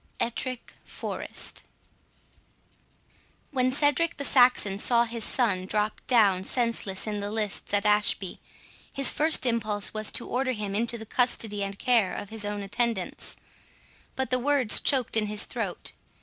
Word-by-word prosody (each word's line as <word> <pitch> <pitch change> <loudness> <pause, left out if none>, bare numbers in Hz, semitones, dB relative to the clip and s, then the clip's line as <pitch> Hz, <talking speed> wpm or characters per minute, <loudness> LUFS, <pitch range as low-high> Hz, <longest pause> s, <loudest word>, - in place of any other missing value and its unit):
ETTRICK 250 +1 -3
FOREST - - -5 1.9
When 255 -2 +2
Cedric 295 +4 +1
the 280 - -3
Saxon 245 -7 +4
saw 235 +1 +4
his 230 -1 -3
son 200 -8 +1
drop 210 +1 0
down 200 -7 +4
senseless 230 -4 -2
in 210 -1 -3
the 205 0 -3
lists 210 -2 -3
at 205 0 +1
Ashby, 210 -3 +1 0.6
his 275 -1 +3
first 310 -2 +2
impulse 215 -4 0
was 215 -1 -2
to 235 - -2
order 255 +1 0
him 210 -3 -4
into 235 +3 +1
the 220 - -9
custody 220 -3 0
and 200 0 -5
care 230 -7 +2
of 205 - -6
his 220 -1 -3
own 205 0 -3
attendants, 205 -1 -2 0.8
but 265 -2 -2
the 255 - +2
words 265 -4 +3
choked 260 -5 +2
in 215 -1 +2
his 210 0 0
throat. - - -4
225 Hz, 150 wpm, -27 LUFS, 205-250 Hz, 1.9 s, Saxon